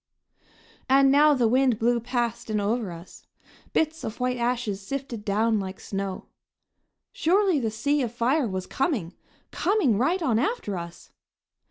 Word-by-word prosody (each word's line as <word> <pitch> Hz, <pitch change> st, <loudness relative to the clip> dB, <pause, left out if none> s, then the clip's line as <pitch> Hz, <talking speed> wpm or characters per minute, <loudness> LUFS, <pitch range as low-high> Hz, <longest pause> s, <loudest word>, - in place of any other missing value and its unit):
And 270 Hz, 0 st, +5 dB
now 295 Hz, +1 st, +5 dB
the 245 Hz, -3 st, +2 dB
wind 255 Hz, 0 st, +3 dB
blew 235 Hz, +2 st, +2 dB
past 240 Hz, -2 st, -2 dB
and 215 Hz, -1 st, 0 dB
over 210 Hz, -1 st, -1 dB
us. 170 Hz, +1 st, -12 dB, 0.4 s
Bits 320 Hz, +1 st, 0 dB
of 220 Hz, -, -5 dB
white 250 Hz, 0 st, 0 dB
ashes 235 Hz, -4 st, -1 dB
sifted 250 Hz, 0 st, -5 dB
down 215 Hz, +2 st, +1 dB
like 190 Hz, -1 st, -6 dB
snow. 195 Hz, -1 st, -5 dB, 0.9 s
Surely 370 Hz, -1 st, +2 dB
the 230 Hz, -4 st, -1 dB
sea 285 Hz, +7 st, 0 dB
of 240 Hz, -4 st, -2 dB
fire 245 Hz, +4 st, +1 dB
was 185 Hz, -2 st, -4 dB
coming, 245 Hz, -, -2 dB, 0.4 s
coming 345 Hz, -, +1 dB
right 340 Hz, +8 st, +1 dB
on 230 Hz, -6 st, +2 dB
after 275 Hz, -, -1 dB
us! 170 Hz, -1 st, -8 dB
240 Hz, 150 wpm, -25 LUFS, 210-275 Hz, 0.9 s, And